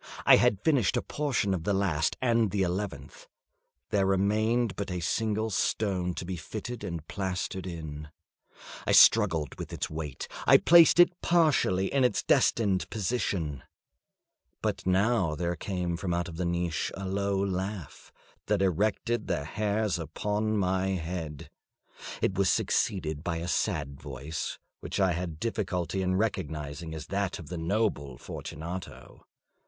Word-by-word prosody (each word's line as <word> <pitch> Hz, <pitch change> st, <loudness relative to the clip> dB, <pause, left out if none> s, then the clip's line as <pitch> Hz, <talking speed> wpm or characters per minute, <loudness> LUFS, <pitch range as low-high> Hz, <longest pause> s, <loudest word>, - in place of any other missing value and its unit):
I -, -, +8 dB
had 100 Hz, -1 st, +2 dB
finished 130 Hz, -6 st, +3 dB
a -, -, -1 dB
portion 135 Hz, -9 st, 0 dB
of 85 Hz, -4 st, -2 dB
the 100 Hz, +2 st, +1 dB
last 90 Hz, -6 st, 0 dB
and 115 Hz, -3 st, +3 dB
the 100 Hz, 0 st, 0 dB
eleventh; 90 Hz, -6 st, -4 dB, 0.6 s
there 100 Hz, -2 st, +2 dB
remained 105 Hz, +3 st, +1 dB
but 100 Hz, 0 st, -4 dB
a 90 Hz, -1 st, -2 dB
single 110 Hz, +5 st, -1 dB
stone 95 Hz, -3 st, 0 dB
to -, -, -5 dB
be 90 Hz, 0 st, -4 dB
fitted 110 Hz, +8 st, -6 dB
and 85 Hz, -3 st, -5 dB
plastered 95 Hz, 0 st, -3 dB
in. 75 Hz, -3 st, -7 dB, 0.8 s
I -, -, +3 dB
struggled 85 Hz, -9 st, +6 dB
with -, -, -6 dB
its -, -, -3 dB
weight; 75 Hz, -4 st, -5 dB, 0.2 s
I -, -, +9 dB
placed 170 Hz, 0 st, +6 dB
it 175 Hz, 0 st, +5 dB
partially 145 Hz, -, +2 dB
in 135 Hz, -2 st, +3 dB
its 125 Hz, -4 st, +2 dB
destined 100 Hz, -5 st, +2 dB
position. 95 Hz, -, -2 dB, 1.0 s
But -, -, -2 dB
now 95 Hz, -3 st, +2 dB
there 85 Hz, +1 st, -2 dB
came 90 Hz, 0 st, -3 dB
from 90 Hz, -1 st, -2 dB
out 85 Hz, -1 st, -3 dB
the 90 Hz, +2 st, -2 dB
niche 85 Hz, -1 st, -1 dB
a 95 Hz, 0 st, -5 dB
low 100 Hz, +1 st, 0 dB
laugh 95 Hz, -3 st, -4 dB, 0.4 s
that -, -, +2 dB
erected 105 Hz, +5 st, 0 dB
the 85 Hz, -6 st, -1 dB
hairs 105 Hz, +2 st, -1 dB
upon 105 Hz, +7 st, -1 dB
my 95 Hz, -1 st, +1 dB
head. 80 Hz, -4 st, -5 dB, 0.7 s
It -, -, +2 dB
was 100 Hz, -, +3 dB
succeeded 80 Hz, -6 st, 0 dB
by 85 Hz, -2 st, -2 dB
a 85 Hz, +1 st, -4 dB
sad 75 Hz, -7 st, -1 dB
voice, 70 Hz, +2 st, -5 dB, 0.2 s
which -, -, -4 dB
I 95 Hz, -2 st, +3 dB
had 85 Hz, -2 st, -4 dB
difficulty 95 Hz, -5 st, -2 dB
in 95 Hz, 0 st, 0 dB
recognising 80 Hz, -6 st, -3 dB
as 80 Hz, -1 st, -6 dB
that 100 Hz, -2 st, -1 dB
of 80 Hz, -, -10 dB
the 90 Hz, -, -4 dB
noble 80 Hz, -, -1 dB
Fortunato. 85 Hz, +8 st, -8 dB
95 Hz, 150 wpm, -29 LUFS, 85-105 Hz, 1.0 s, I